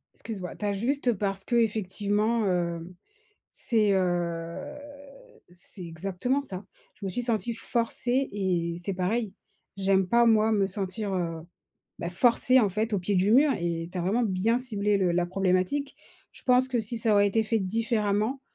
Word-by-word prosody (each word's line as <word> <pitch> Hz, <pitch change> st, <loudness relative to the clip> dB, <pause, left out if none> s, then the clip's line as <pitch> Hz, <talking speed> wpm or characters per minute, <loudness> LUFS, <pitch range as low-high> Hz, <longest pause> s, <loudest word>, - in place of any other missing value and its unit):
excuse-moi, 190 Hz, -6 st, -7 dB
tu 210 Hz, -, -5 dB
as 205 Hz, -, +1 dB
juste, 255 Hz, +6 st, -1 dB
heu, 230 Hz, -, +1 dB
parce 195 Hz, -1 st, -2 dB
que, 240 Hz, -, -1 dB
effectivement, 215 Hz, 0 st, +1 dB
heu, 170 Hz, -1 st, -1 dB, 0.6 s
c'est, 215 Hz, -3 st, +1 dB
heu, 175 Hz, -, -2 dB, 0.8 s
c'est 180 Hz, +1 st, -8 dB
exactement 195 Hz, -, -2 dB
ça. 190 Hz, -8 st, -7 dB, 0.3 s
Je 200 Hz, -, -9 dB
me 195 Hz, -, -1 dB
suis 245 Hz, +7 st, -2 dB
sentie 235 Hz, -1 st, -1 dB
forcée 245 Hz, +3 st, -1 dB
et 180 Hz, -4 st, -1 dB
c'est 195 Hz, +2 st, -2 dB
pareil. 195 Hz, +3 st, -1 dB, 0.4 s
J'aime 190 Hz, -1 st, +2 dB
pas, 235 Hz, +4 st, +4 dB
moi, 220 Hz, -1 st, +4 dB
me 200 Hz, -3 st, +2 dB
sentir, 195 Hz, +1 st, -4 dB
heu, 165 Hz, -3 st, -2 dB, 0.6 s
bah, 170 Hz, -1 st, -4 dB
forcée, 250 Hz, +5 st, +4 dB
en 210 Hz, -, +3 dB
fait, 215 Hz, +4 st, -2 dB
au 205 Hz, -, +2 dB
pied 190 Hz, +3 st, -1 dB
du 195 Hz, +3 st, +3 dB
mur 285 Hz, +4 st, +6 dB
et 170 Hz, -1 st, -2 dB
tu 185 Hz, -, -9 dB
as -, -, 0 dB
vraiment 210 Hz, +7 st, +1 dB
bien 220 Hz, +3 st, +1 dB
ciblé 210 Hz, -5 st, 0 dB
le 180 Hz, -2 st, +2 dB
la 175 Hz, 0 st, +2 dB
problématique. 190 Hz, +9 st, 0 dB, 0.4 s
Je -, -, -16 dB
pense 255 Hz, 0 st, +3 dB
que 250 Hz, -2 st, 0 dB
si 225 Hz, +2 st, -4 dB
ça 220 Hz, -1 st, +2 dB
aurait 205 Hz, 0 st, +5 dB
été 220 Hz, +3 st, +2 dB
fait 220 Hz, +1 st, 0 dB
différemment, 215 Hz, +3 st, 0 dB
205 Hz, 175 wpm, -27 LUFS, 185-230 Hz, 0.8 s, mur